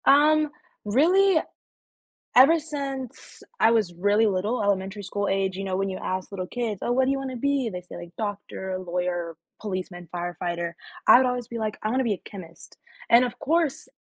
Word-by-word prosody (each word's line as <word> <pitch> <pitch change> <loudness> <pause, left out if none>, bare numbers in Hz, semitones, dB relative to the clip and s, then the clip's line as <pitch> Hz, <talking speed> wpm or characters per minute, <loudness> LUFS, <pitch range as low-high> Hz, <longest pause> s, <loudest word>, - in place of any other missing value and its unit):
Um, 305 +2 +5 0.4
really? 340 - +4 1.0
Ever 285 +7 +7
since 275 -5 -6 0.2
I - - +6
was 215 -6 +1
really 205 +5 +2
little- 205 +4 0
elementary 200 0 -1
school 205 +1 -2
age, 195 -1 0
you 195 - -4
know, 190 -1 -2
when 195 0 0
you 190 - -4
ask 185 +1 -4
little 185 -2 -4
kids, 225 -2 -3
"Oh, - - -1
what 260 +2 +3
do 265 - +2
you 275 - 0
wanna 265 -1 -5
be?" 275 -1 0
they 180 -3 -6
say, 180 - -12
like, 175 0 -10
"doctor, 200 -3 -4
lawyer, 175 -2 -3 0.3
policeman, 185 -4 -5
firefighter"- 175 -1 -3 0.3
I - - +10
would 260 0 +3
always 250 -2 -2
be 235 -1 -5
like, 215 -1 -2
"I 215 - 0
wanna 260 +2 +1
be 230 -4 +1
a - - -5
chemist," 180 -5 -12 0.3
and, 235 +2 +7
of 250 0 -3
course, 320 -1 0
210 Hz, 190 wpm, -25 LUFS, 185-260 Hz, 1.0 s, I